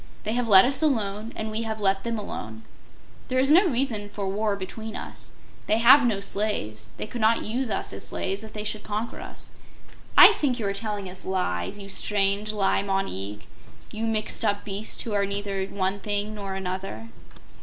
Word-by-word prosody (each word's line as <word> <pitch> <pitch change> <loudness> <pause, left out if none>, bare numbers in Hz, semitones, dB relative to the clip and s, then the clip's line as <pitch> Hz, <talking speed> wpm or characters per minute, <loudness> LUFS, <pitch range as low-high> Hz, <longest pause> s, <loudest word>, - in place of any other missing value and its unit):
They 215 - -1
have 245 0 +1
let 190 -3 +8
us 270 +4 +3
alone, 220 -7 0
and 220 0 -4
we 220 +1 -2
have 220 -1 -3
let 195 -1 +1
them 235 -1 -2
alone. 110 - -6 0.6
There 255 - -1
is 270 +2 +4
no 365 +5 +7
reason 240 -7 -1
for 205 -1 -4
war 205 +1 0
between 220 +3 -7
us. - - -8 0.3
They 215 - +3
have 245 +3 +7
no 205 -4 0
slaves. 195 - -1
They - - -3
could 235 +2 -6
not 220 +1 +3
use 245 +3 -2
us - - -2
as - - -5
slaves 195 +3 -2
if 220 - -9
they 210 - -5
should 210 0 -3
conquer 215 +3 -4
us. - - -10 0.7
I - - +11
think 265 -5 0
you 225 - -3
are 200 - 0
telling 205 -1 -3
us 185 0 -10
lies, 185 - -2
you 200 -1 -8
strange 200 +1 0
Li 200 -3 +1
Mon 195 -1 0
Eag 100 +2 -5 0.5
you 220 +1 -3
mixed 215 0 -1
up 205 -2 0
beast 205 +1 -3
who 225 - -4
are 200 -1 +2
neither 200 -1 -2
one 195 0 -2
thing 205 +1 -2
nor 200 -2 -5
another." 185 - -5
205 Hz, 200 wpm, -26 LUFS, 195-220 Hz, 0.7 s, I